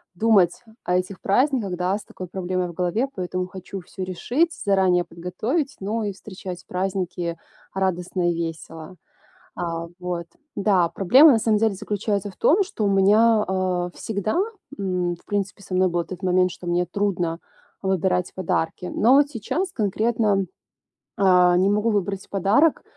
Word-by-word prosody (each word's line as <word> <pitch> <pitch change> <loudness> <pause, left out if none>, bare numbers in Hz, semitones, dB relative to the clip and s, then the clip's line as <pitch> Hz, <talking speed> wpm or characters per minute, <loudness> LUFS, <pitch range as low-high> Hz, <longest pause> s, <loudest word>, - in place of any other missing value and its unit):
думать 195 -3 +3 0.2
о 180 - 0
этих 185 +1 -4
праздниках, 230 -3 +1
да, 180 +3 0
с 210 - -10
такой 185 - -9
проблемой 185 0 -2
в - - -9
голове, 180 +9 0
поэтому 180 0 -3
хочу 190 +1 -8
всё 185 +1 -7
решить, 250 - 0
заранее 190 -3 +3
подготовить, 215 - -3
ну 215 +3 -2
и 205 - -1
встречать 185 -2 -9
праздники 180 -2 -2 0.4
радостно 180 -1 0
и - - -3
весело. 165 0 -6 0.6
А, 170 -1 -3
вот, 175 -2 -4 0.3
да. 190 -4 +2
Проблема 260 - +6
на 230 - +3
самом 215 -1 +2
деле 220 0 +2
заключается 205 0 -2
в - - -21
том, 390 +6 +4
что 370 - -3
у - - +2
меня, 210 +3 +4
э, 185 -1 -1
всегда, 215 - -2 0.4
м, 180 -3 -1
в - - -25
принципе 200 0 -3
со 185 - -8
мной 185 0 +3
был 175 0 0
этот 180 +2 -8
момент, 185 0 +3
что 175 - -10
мне 175 +1 +1
трудно 175 -3 -1 0.4
выбирать 190 -1 0
подарки. 180 -1 -2
Но 245 +5 +4
вот 285 0 +4
сейчас 290 - -3
конкретно, 215 -1 +1 0.7
а, 180 -2 +5
не 190 +2 +3
могу 210 +2 +1
выбрать 195 -2 -2
подарок, 205 - +3
190 Hz, 155 wpm, -23 LUFS, 180-210 Hz, 0.7 s, Проблема